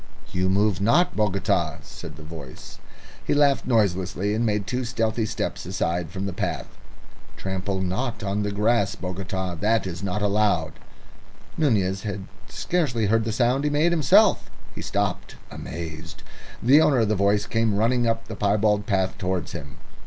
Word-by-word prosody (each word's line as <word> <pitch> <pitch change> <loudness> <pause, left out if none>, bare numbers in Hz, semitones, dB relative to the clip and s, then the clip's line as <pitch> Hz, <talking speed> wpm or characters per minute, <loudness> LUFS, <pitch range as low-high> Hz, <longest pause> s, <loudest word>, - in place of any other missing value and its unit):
"You 95 0 +1
move 100 -1 +2
not, 150 - +3
Bogota," 105 -2 +1
said - - -10
the 75 - -12
voice. 75 -5 -10 0.4
He - - 0
laughed 145 -2 +3
noiselessly, 100 -3 +1
and 110 +2 0
made 105 -3 0
two 125 +5 -2
stealthy 115 -2 -1
steps 115 - -3
aside 90 -2 -2
from 95 0 -4
the 100 - -3
path. - - -2 0.7
"Trample 95 0 -3
not 105 +6 -2
on 100 +1 -1
the 105 0 -1
grass, 110 +4 +1
Bogota; 95 0 -4
that 105 +6 +1
is 90 -2 -5
not 100 +1 -2
allowed." 100 -7 +1 0.8
Nunez 100 -10 +1
had 100 -2 -5 0.2
scarcely 140 -11 0
heard 115 -1 +2
the 110 - -1
sound 125 +4 +2
he 150 - +2
made 150 +4 +2
himself. 160 -5 +4 0.2
He - - -7
stopped - - -2 0.2
amazed. 80 0 -7 0.4
The 135 +6 +7
owner 135 -6 +4
of 110 - +2
the 110 - +1
voice 100 +1 +2
came 115 -2 +1
running 120 +2 +2
up 115 0 -1
the 110 - -6
piebald 105 +1 +1
path 95 -3 0
towards 90 -2 -2
him. 70 -3 -8
105 Hz, 160 wpm, -24 LUFS, 95-115 Hz, 0.8 s, The